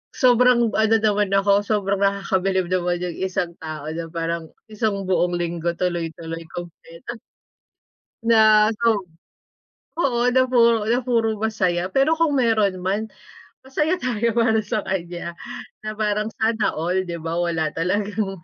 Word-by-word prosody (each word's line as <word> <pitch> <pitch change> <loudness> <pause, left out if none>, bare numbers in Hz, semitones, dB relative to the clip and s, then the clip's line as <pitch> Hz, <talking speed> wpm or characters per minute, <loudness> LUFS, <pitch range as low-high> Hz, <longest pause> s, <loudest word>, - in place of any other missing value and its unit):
sobrang 245 -3 +4
ano 220 0 +3
naman 210 -2 +2
ako, 200 +1 +3
sobrang 200 -2 0
nakakabilib 195 -2 0
naman 175 -1 0
yung 180 - -2
isang 185 -2 -2
tao 155 -2 -7
na 165 +1 -5
parang 165 0 -3 0.2
1 210 -2 -1
buong 180 -1 +1
linggo 170 0 -2
tuloy-tuloy 165 -2 -3
kumpleto. 175 +5 -9 1.0
Na 220 -2 +5
so 215 -3 +1 0.9
oo 250 -6 +1
na 255 0 +3
puro 230 -3 +3
na 240 +2 +2
puro 225 -3 +1
masaya. 190 -4 -1
Pero 275 +4 +3
kung 330 -2 +2
meron 215 -6 +2
man, 195 +4 -1 0.6
masaya 300 +6 0
tayo 235 -7 -1
para 225 -1 +3
sa 210 0 -3
kanya. 175 -2 -4 0.5
Na 215 0 -6
parang 210 0 0
sana 220 -1 +1
all, 180 +4 0
'di 175 -2 -5
ba? 165 0 -5
Wala 165 -3 -1
talagang 200 +3 -1
200 Hz, 135 wpm, -22 LUFS, 175-225 Hz, 1.0 s, Na